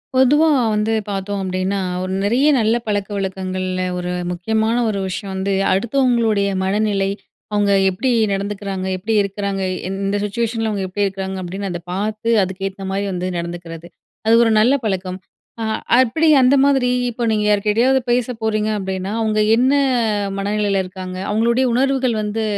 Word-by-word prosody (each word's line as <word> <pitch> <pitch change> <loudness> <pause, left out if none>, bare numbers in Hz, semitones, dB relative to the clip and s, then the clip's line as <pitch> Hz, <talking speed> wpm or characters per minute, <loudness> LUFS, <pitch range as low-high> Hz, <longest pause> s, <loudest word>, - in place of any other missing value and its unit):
பொதுவா 290 +5 +5 0.3
வந்து 210 +1 0 0.2
பாத்தோம் 200 0 -3
அப்டின்னா, 185 +1 -1 0.2
ஒரு 185 0 -3
நெறைய 240 +8 +2
நல்ல 220 +1 +2
பழக்கவழக்கங்கள்ல 190 -2 -2 0.2
ஒரு 180 0 -3 0.2
முக்கியமான 220 +5 0
ஒரு 200 -2 -2
விஷயம் 190 +1 -5
வந்து 190 +1 -1 0.2
அடுத்தவங்களுடைய 230 -2 +1 0.2
மனநிலை, 200 0 0 0.4
அவங்க 205 -1 +2 0.2
எப்டி 225 +8 -1 0.2
நடந்துக்கிறாங்க, 195 -1 -3
எப்டி 210 +5 -2
இருக்கிறாங்க, 200 0 -3 0.3
இந்த 195 +1 -1
சிச்சுவேஷன்ல 225 +1 -2
அவங்க 200 -2 -2
எப்டி 205 +2 0
இருக்கிறாங்க, 190 0 -5
அப்டின்னு 190 +2 -5
அத 175 -1 -5
பார்த்து 215 +3 -2 0.2
அதுக்கு 190 +1 -4
ஏத்த 195 0 -9
மாரி 200 +1 -1
வந்து 180 +1 -2
நடந்துக்கிறது. 170 -1 -7 0.4
அது 225 - +5
ஒரு 225 - +2
நல்ல 245 +5 +4
பழக்கம். 185 -2 -2 0.4
ஆ - - -1 0.3
அப்டி 260 +6 +3
அந்த 255 +2 +5
மாதிரி, 270 -3 +3 0.2
இப்போ 240 0 -3
நீங்க 210 -1 +1
யார்கிட்டயாவது 215 +6 +3
பேச 245 0 +1
போறீங்க 215 -1 0
அப்டின்னா 190 0 -4
அவங்க 215 -1 +1 0.2
என்ன 255 +3 +3 0.7
மனநிலையில 200 0 0
இருக்காங்க. 185 0 -7
அவங்களுடைய 235 +4 +2
உணர்வுகள் 260 -1 +1
வந்து 210 +1 -2
205 Hz, 145 wpm, -19 LUFS, 190-225 Hz, 0.7 s, பொதுவா